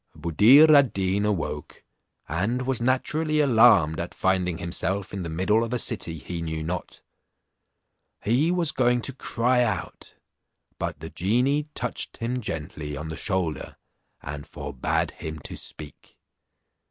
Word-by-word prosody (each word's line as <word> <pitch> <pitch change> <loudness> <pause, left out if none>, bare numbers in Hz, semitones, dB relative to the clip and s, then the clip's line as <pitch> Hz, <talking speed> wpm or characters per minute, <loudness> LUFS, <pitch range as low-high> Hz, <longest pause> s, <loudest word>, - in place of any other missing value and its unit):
Buddir 115 - +6
ad 135 -6 +5
Deen 95 +1 0
awoke, 80 -7 -3 0.4
and 110 +10 -1
was 130 -2 -1
naturally 155 +5 +1
alarmed 110 - +5
at 85 +1 -5
finding 90 -2 0
himself 95 +4 -3
in 100 - -3
the 85 - -4
middle 95 +7 +1
of 115 +1 -4
a - - +1
city 105 -9 -1
he 85 +3 -6
knew 80 -1 -3
not; 85 +3 -5 1.2
he 130 +10 +2
was 175 -4 +1
going 125 -1 +2
to 135 - -3
cry 125 0 +1
out, 90 -7 -4 0.6
but - - -4
the 80 - -7
genie 125 - +1
touched - - -3
him 125 +2 -2
gently 75 -6 -5
on 75 +2 -6
the 80 - -5
shoulder, 90 -6 -3 0.5
and 70 +1 -7
forbad 65 - -2
him 80 0 -7
to 75 - -8
speak. 75 -2 -9
100 Hz, 140 wpm, -25 LUFS, 80-125 Hz, 1.2 s, Buddir